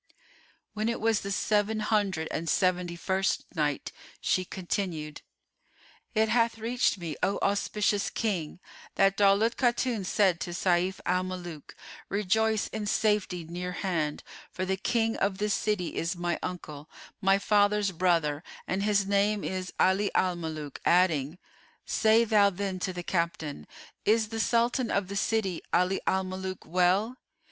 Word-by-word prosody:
When 215 +1 -1
it 235 - -2
was 225 -1 +2
the 200 - -5
Seven 210 +2 +1
Hundred 205 -6 0
and 165 0 -3
Seventy 180 -2 +1
first 190 +2 0
Night, 150 -2 -1 0.3
She 185 - +1
continued, 175 -5 -4 0.9
It 220 0 +3
hath 230 0 +2
reached 235 0 +1
me, 165 -4 -5
O 195 +2 +1
auspicious 205 0 +1
King, 180 -8 -2 0.4
that 195 0 +4
Daulat 205 +3 +3
Khatun 240 -3 +1
said 185 -2 +2
to 175 - -4
Sayf 180 +1 +1
al 180 +1 +2
Muluk, 175 -5 -7 0.3
"Rejoice 215 +2 +1
in 215 -1 -4
safety 210 -5 +1
near 180 +2 -5
hand; 165 -6 -2 0.3
for 185 - -4
the 190 +1 0
King 225 +3 0
of 195 -1 0
this 210 +1 0
city 210 -5 -1
is 170 +3 -1
my 175 0 -2
uncle, 155 -5 -6 0.3
my 195 0 +4
father's 205 0 +2
brother 165 -4 +1 0.2
and 190 +1 -1
his 205 -1 +2
name 200 +1 +1
is 185 -1 -3
'Ali 195 +2 +3
al 185 -1 +2
Mulúk,"[FN#430] 155 -4 -6
adding, 170 -4 +2 0.5
"Say 220 +1 +4
thou 210 -2 +5
then 195 -1 -4
to 185 - -2
the 175 -1 -6
captain, 165 - -2 0.4
'Is 220 0 +2
the 225 0 -4
Sultan 235 +2 +1
of 200 -2 0
the 200 - -5
city, 195 -4 0
Ali 180 +2 +2
al 190 0 +2
Muluk, 185 0 -5
well? 185 +8 +2
190 Hz, 150 wpm, -28 LUFS, 175-210 Hz, 0.9 s, thou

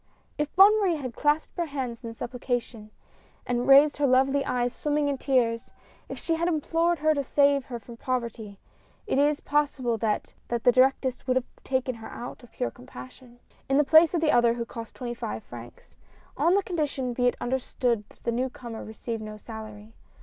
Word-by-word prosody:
If 295 0 -2
Bonne 410 +3 +7
Marie 365 -4 +2
had 260 -5 -5
clasped 300 +1 0
her 340 -1 -1
hands 260 -4 -5
in 230 - -5
supplicar 245 +1 -2
tion, 220 -2 -13 0.6
and 245 0 -1
raised 280 +2 +7
her 285 -1 +2
lovely 270 +2 +3
eyes 245 -1 -1
swimming 295 -1 0
in 280 -2 -1
tears; 240 -4 0 0.4
if - - -6
she 330 - -1
had 330 +1 0
implored 335 +1 +1
her 310 +1 +2
to 285 -2 -1
save 280 0 +3
her 245 - -6
from 230 +1 -12
poverty, 230 -5 -4 0.5
it - - 0
is 290 +1 +2
possible 275 -6 0
that 210 -1 -1
the 240 - 0
directress 260 0 +2
would 255 - +2
have 260 -1 +1 0.2
taken 260 -1 -1
her 225 -1 -10
out 245 - -8
of 245 - -17
pure 120 - -3
compassion, 130 - -13 0.3
in 270 - +3
the 295 - +5
place 315 +3 +6
of 335 - +1
the 310 -2 +3
other 235 -1 +4
who 235 -1 -3
cost 230 -1 -9
twenty 240 -1 -5
five 110 - -5
francs 120 0 -12 0.2
— - - -29
on 345 +3 +5
the 400 - +2
condition 290 -8 -2
be 245 +1 +1
it 245 - 0
understood 245 -3 -1
that - - -22
the 235 - 0
new 250 +3 -1
comer 235 -3 -8
received 220 +1 -6
no 215 0 -7
salary. 215 -1 -10
255 Hz, 200 wpm, -27 LUFS, 235-290 Hz, 0.6 s, Bonne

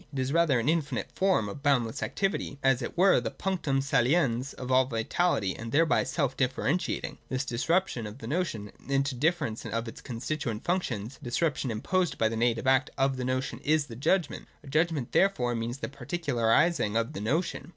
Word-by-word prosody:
It 140 - -7
is 130 +2 -1
rather 165 -7 +3
an 115 - -2
infinite 160 -2 0
form, 190 - +2
of 100 +8 -7
boundless 125 -6 +1
activity, 195 -7 -2
as 135 -2 +3
it - - -5
were 190 +2 +5
the - - -2
punctuin 155 -8 -1
saliens 130 -1 +2
of 130 0 -5
all 130 0 +5
vitality, 115 - 0
and 115 0 -7
thereby 160 +4 +3
self 140 -5 -1
differentiating. 135 +6 -1
This 130 +1 -1
disruption 130 - 0
of 105 +3 -9
the 115 - -9
notion 120 - -2 0.2
into 140 0 +1
the 125 - -9
differ 160 0 +2
ence 110 -1 -5
of 115 +1 -3
its 115 - -8
constituent 120 -2 -4
functions, 135 - -2
— - - -33
a - - -16
disruption 135 +1 0
imposed 175 +11 0
by 110 - +2
the 115 - -3
native 115 0 +1
act 130 0 +3
of 135 0 +2
the 130 - -4
notion, 130 +1 -2
is 155 -1 +2
the 115 - -9
judgment. 155 +6 0 0.2
A - - -14
judgment 155 -2 0
therefore 130 -11 +2
means 115 +2 -3
the - - -4
particularising 140 -4 +1
of 115 0 -1
the 100 - -5
notion. 145 - -1
135 Hz, 195 wpm, -28 LUFS, 115-160 Hz, 0.2 s, were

